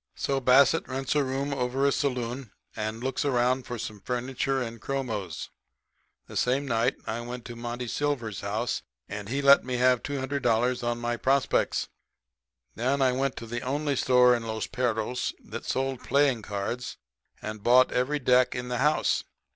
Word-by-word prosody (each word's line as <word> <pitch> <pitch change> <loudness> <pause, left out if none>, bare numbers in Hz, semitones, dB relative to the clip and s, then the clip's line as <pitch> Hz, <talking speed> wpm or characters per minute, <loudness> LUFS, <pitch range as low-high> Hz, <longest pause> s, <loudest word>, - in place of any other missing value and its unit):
"So, 135 -1 0
Bassett 135 +4 +5
rents 135 0 -2
a 145 - +3
room 135 +2 -2
over 130 +1 0
a 140 - +4
saloon 125 -3 -2 0.3
and 110 +2 -4
looks 130 0 -1
around 130 -1 +1
for 120 - -4
some 105 -2 -6
furniture 130 +3 -1
and 115 -3 -5
chromos. 110 -11 -4 0.7
The - - -11
same 130 +3 +1
night 115 -2 +1
I 115 +2 -3
went 120 0 -7
to 120 - -7
Monty 120 +1 -5
Silver's 120 -6 -2
house, - - -2 0.3
and 100 0 -6
he 140 +3 -1
let 140 0 +7
me 125 0 -3
have 125 -1 +4
$200 130 -3 0
on 120 0 0
my 120 0 -2
prospects. 135 +2 +1 0.9
Then 130 +5 0
I 130 -1 +4
went 135 +1 -1
to 115 - -7
the 120 +1 -4
only 145 +2 -1
store 125 -1 +5
in 120 - -3
Los 110 -1 -2
Perros 125 0 -1
that - - -7
sold 135 -1 -1
playing 140 -3 +2
cards 105 +5 -4 0.4
and 110 0 -6
bought 125 +3 +5
every 130 +4 +1
deck 125 -2 +3
in 125 0 -4
the 125 -1 -2
house. 150 +3 +2
125 Hz, 170 wpm, -27 LUFS, 120-135 Hz, 0.9 s, let